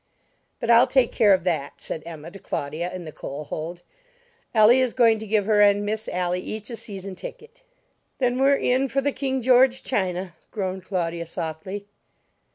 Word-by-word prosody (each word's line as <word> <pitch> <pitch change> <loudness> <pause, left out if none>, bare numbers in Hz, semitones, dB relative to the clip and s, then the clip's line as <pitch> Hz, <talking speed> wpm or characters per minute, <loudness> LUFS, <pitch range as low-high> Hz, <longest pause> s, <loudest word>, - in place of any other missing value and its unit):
"But 235 - +1
I'll 235 +1 +7
take 260 -3 +3
care 210 -2 +4
of 185 -3 +4
that," 155 -6 -2
said 160 - -5
Emma 165 0 -8
to 195 - -11
Claudia 165 -1 -4
in 180 -1 -7
the 155 - -7
coal 145 0 -7
hold. 165 +4 -6 0.7
"Elly 225 +3 +6
is 255 -2 0
going 230 -3 +4
to 220 - -7
give 210 -1 +1
her 210 -1 +4
and 205 0 +4
Miss 215 +1 -3
Ally 180 0 -1
each 215 +5 -6
a - - -4
season 200 -4 -7
ticket." 465 - -10 0.6
"Then 250 -1 +1
we're 275 +1 +5
in 260 0 +1
for 275 +2 0
the 285 +1 0
King 265 -2 -2
George 255 +1 +4
china!" 185 -5 -2 0.2
groaned 190 -3 -4
Claudia 170 -3 -2
softly. 165 +5 -5
205 Hz, 180 wpm, -24 LUFS, 175-245 Hz, 0.7 s, I'll